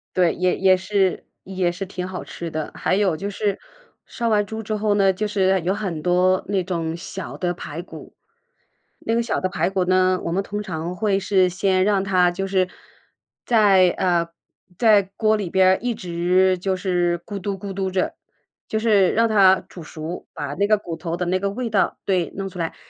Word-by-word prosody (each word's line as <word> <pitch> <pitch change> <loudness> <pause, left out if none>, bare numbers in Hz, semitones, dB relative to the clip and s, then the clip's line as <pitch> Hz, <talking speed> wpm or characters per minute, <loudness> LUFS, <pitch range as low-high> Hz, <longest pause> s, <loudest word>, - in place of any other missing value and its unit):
对， 180 -3 +3
也 180 0 0
也 190 -1 +4
是 190 0 0 0.2
也 185 -2 -1
是 180 +3 -5
挺 185 -1 -5
好 185 -1 -6
吃 170 - -7
的。 155 -1 -4
还 185 - 0
有 190 -5 +1
就 200 +5 -4
是 205 0 -2 0.5
杀 235 -1 -3
完 210 -2 +2
猪 220 +2 -6
之 215 - -3
后 210 0 +1
呢， 195 -1 +4
就 210 +3 -2
是 190 -2 +2
有 185 +3 +1
很 190 -6 -4
多 180 +2 +2
那 195 -1 0
种 165 -3 -3
小 185 +2 -7
的 175 -1 -1
排 170 -2 -7
骨。 160 -3 -12 0.8
那 225 - -1
个 235 - +1
小 230 - -1
的 185 - 0
排 175 0 -1
骨 190 -1 +1
呢， 185 0 +2
我 170 - -3
们 190 +3 0
通 205 +1 -4
常 170 -2 -5
会 200 0 +1
是 190 -1 +2
先 185 +1 +1
让 200 -1 +2
它 185 -2 +3
就 180 +2 -3
是 190 -1 +1 0.8
在， 200 -6 +5
呃， 170 -2 +1 0.5
在 215 -3 +5 0.2
锅 215 -1 +3
里 200 -4 -3
边 185 +1 +4
儿 190 - +4
一 240 0 -1
直 180 +1 +1
就 190 +1 -1
是 180 -2 0
咕 200 -1 -5
嘟 195 +1 -3
咕 195 0 -6
嘟 190 0 -2
着， 185 0 -1 0.5
就 220 - -2
是 210 -4 +3
让 230 +1 +3
它 195 -4 +5
煮 175 - -11
熟， 160 +2 -7
把 145 -1 -5
那 200 +7 0
个 215 0 +4
骨 175 -5 -6
头 165 +1 -4
的 180 - -2
那 185 +2 0
个 200 +1 -1
味 230 +3 -4
道 200 -3 +1
对， 185 -4 0
弄 195 0 -4
出 180 -1 -10
来。 165 -1 -3
190 Hz, 225 characters per minute, -22 LUFS, 180-200 Hz, 0.8 s, 在